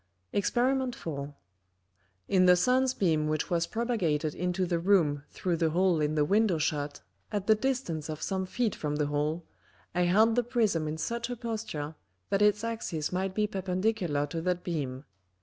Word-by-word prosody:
Exper. 250 +5 +1
4. 145 -5 -6 0.9
In 185 -1 +4
the 180 - +8
Sun's 255 +7 +2
Beam 160 -5 +1
which 155 +2 -1
was 170 -1 +1
propagated 175 -11 0
into 180 +1 -1
the 170 -1 0
Room 165 -6 +3
through 175 -3 -2
the 160 0 +2
hole 175 0 +2
in 150 +1 0
the 150 -1 +3
Window 205 0 +3
shut, 145 -2 -2 0.3
at 205 -3 -2
the 220 - +6
distance 215 - -2
of 155 -1 -4
some 190 +2 -2
Feet 230 +1 0
from 150 -1 -3
the 150 0 +1
hole, 150 +3 -1 0.5
I 180 0 +2
held 215 +6 +4
the 245 - +3
Prism 215 -9 +1
in 155 +1 -3
such 235 +7 -3
a 245 - -3
Posture, 220 -11 -4 0.4
that 195 - +2
its 210 +1 +4
Axis 220 -9 -3
might 190 +1 -2
be 215 - +2
perpendicular 185 -5 -1
to 165 +3 -4
that 180 +1 -1
Beam. 140 -5 -3
180 Hz, 175 wpm, -29 LUFS, 155-215 Hz, 0.9 s, the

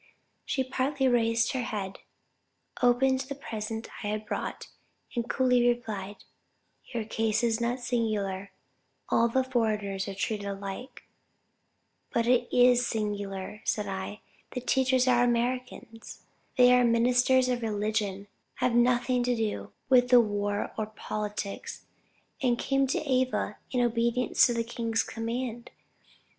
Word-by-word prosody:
She 265 - 0
partly 265 +1 0
raised 230 -1 +2
her 260 - -1
head, 200 -5 -4 0.8
opened 260 +2 +3
the 270 +1 -5
present 225 -5 -5 0.2
I - - -2
had 215 +1 -3
brought, - - -4 0.5
and 235 0 -2
coolly 250 -2 +3
replied, 215 -5 -2 0.6
'Your 235 -3 -4
case 225 +1 0
is 230 -1 +1
not 240 +2 -1
singular; 210 -5 -1 0.6
all 230 - +4
the 260 +3 +1
foreigners 210 -6 -1
are 195 - -5
treated 205 0 -2
alike.' 200 +5 -6 1.1
But 230 - +1
it 245 0 +2
is 245 0 +5
singular, 205 -3 -3
said 210 - -1
I, 195 +2 -5 0.3
the 250 - -3
teachers 260 0 +2
are 245 -1 +4
Americans; 240 -1 -2 0.3
they 250 0 +7
are 250 0 +5
ministers 245 +2 +3
of 250 -1 0
religion, 210 -2 -1 0.3
have 250 -2 0
nothing 245 +1 +3
to 245 0 +1
do 220 -2 -3 0.2
with 250 -1 +4
war 205 -4 +2
or 215 - -1
politics, 210 -2 -5 0.6
and 245 -3 +2
came 275 +1 +1
to 260 - 0
Ava 255 -1 0
in 250 - 0
obedience 235 +2 +3
to 240 - -1
the 230 - 0
king's 230 -1 -1
command. 235 +1 -4
235 Hz, 130 wpm, -28 LUFS, 210-250 Hz, 1.1 s, they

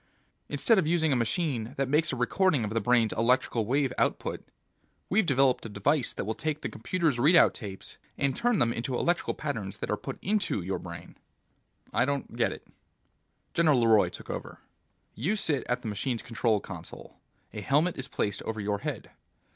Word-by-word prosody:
Instead 225 -4 +3
of 155 - 0
using 160 -3 +2
a - - +2
machine 120 -1 -1
that 135 -1 0
makes 150 +4 +2
a - - -2
recording 140 +3 +2
of 105 - -3
the 115 0 0
brain's 115 0 +3
electrical 115 -1 +1
wave 135 0 +1
output, - - -1 0.7
we've 200 -1 +3
developed 135 -2 +3
a 115 - -6
device 120 +7 +1
that - - -5
will 110 - -1
take 155 +4 -3
the - - -3
computer's 145 +3 -1
readout 160 +7 +6
tapes, 100 -4 -8 0.2
and 140 -2 0
turn 240 -2 +2
them 115 -6 +2
into 125 +2 -3
electrical 175 +7 0
patterns 110 -10 -4
that - - -4
are - - +2
put - - -6
into 205 - +1
your 95 +2 -2
brain!" - - -10 0.8
"I 125 - +3
don't 140 -3 -3
get 115 -1 +1
it." - - -9 0.9
General 155 -6 +4
LeRoy 110 -2 +5
took - - -8
over. - - -6 0.6
"You 165 - -1
sit 155 -9 +1
at 125 +1 -1
the - - -4
machine's 115 +3 -2
control 115 -2 +1
console. 90 -4 -10 0.4
A 105 - -5
helmet 150 - +2
is 135 - -5
placed 100 -6 -2
over 110 -1 -4
your 100 0 -1
head. - - -5
125 Hz, 185 wpm, -28 LUFS, 110-155 Hz, 0.9 s, readout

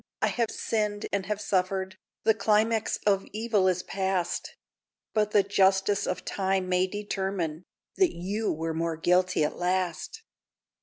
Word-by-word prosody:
I - - +2
have 235 -2 0
sinned 210 -2 -1
and 195 -2 -1
have 210 -1 -1
suffered; 190 -1 -1 0.3
The 220 - +5
climax 220 +1 +2
of 195 -2 +3
evil 215 -3 +1
is 185 -1 +1
past; 190 -2 -2 0.6
But 210 -1 +2
the 205 -1 +4
justice 195 0 +2
of 185 - -3
time 190 -1 0
may 180 0 +2
determine 190 -5 -3 0.3
That 375 -3 +3
you 200 +6 -2
were 160 +1 -2
more 165 0 -1
guilty 180 0 +2
at 150 - -1
last! 185 - -2
190 Hz, 145 wpm, -28 LUFS, 180-210 Hz, 0.6 s, The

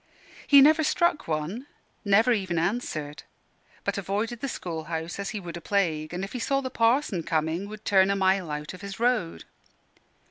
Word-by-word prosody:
He 280 -1 +8
never 310 +3 +6
struck 345 0 +1
one; 165 - -3 0.4
never 215 +4 +4
even 190 -6 0
answered; 160 -6 -2 0.6
but - - -1
avoided 210 +5 -2
the 275 - -3
school 165 -8 -5
house 165 +2 -4
as 200 0 -3
he 215 0 -4
would 175 -2 -7
a - - -9
plague; 160 -6 0
and 180 +2 -4
if 195 - -6
he 250 - -3
saw 275 +4 +1
the 260 -2 -5
Parson 230 - +2
coming 160 +5 -1
would 215 0 -10
turn 190 -1 +4
a 200 - +2
mile 190 -2 +1
out 150 +2 -5
of 185 - -11
his 200 0 -7
road. 235 -8 0
195 Hz, 185 wpm, -26 LUFS, 170-230 Hz, 0.6 s, He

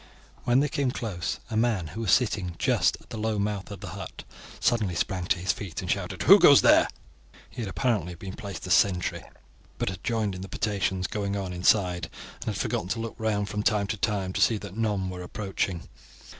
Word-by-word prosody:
When 125 +2 +4
they 150 - +2
came 140 -2 0
close, 100 -9 -3
a - - -2
man 110 -8 +1
who 110 - -6
was 110 - +1
sitting 100 -8 +2
just - - +2
at - - -22
the 110 - -5
low 110 0 0
mouth 100 -1 -2
of 100 -3 -8
the 100 - -6
hut - - -8 0.4
suddenly 110 -7 +1
sprang 90 +1 -1
to 95 +1 +2
his 90 +2 +1
feet 95 -6 -6
and - - -2
shouted, - - -2
"Who - - +9
goes - - +8
there?" - - +6 0.6
He - - -6
had 105 - -3
apparently 100 -5 0
been 95 +2 -8
placed 100 -3 -7
as 90 - +2
sentry, 90 -2 +2 0.5
but - - -1
had 95 -1 -7
joined 110 -4 0
in 90 - -6
the 95 - -7
potations 95 -3 -1
going 100 -1 -2
on 95 -2 -4
inside, 90 -1 +2 0.3
and - - -8
had - - -2
forgotten 85 - -1
to 110 +5 -2
look 115 0 -4
round 105 -2 0
from 105 +1 -2
time 105 -2 +2
to 110 +2 -3
time 100 -3 -1
to 100 - -1
see 115 0 +4
that 100 -2 -9
none 105 -4 0
were 90 -1 -5
approaching. 95 -2 -3
100 Hz, 215 wpm, -27 LUFS, 95-110 Hz, 0.6 s, Who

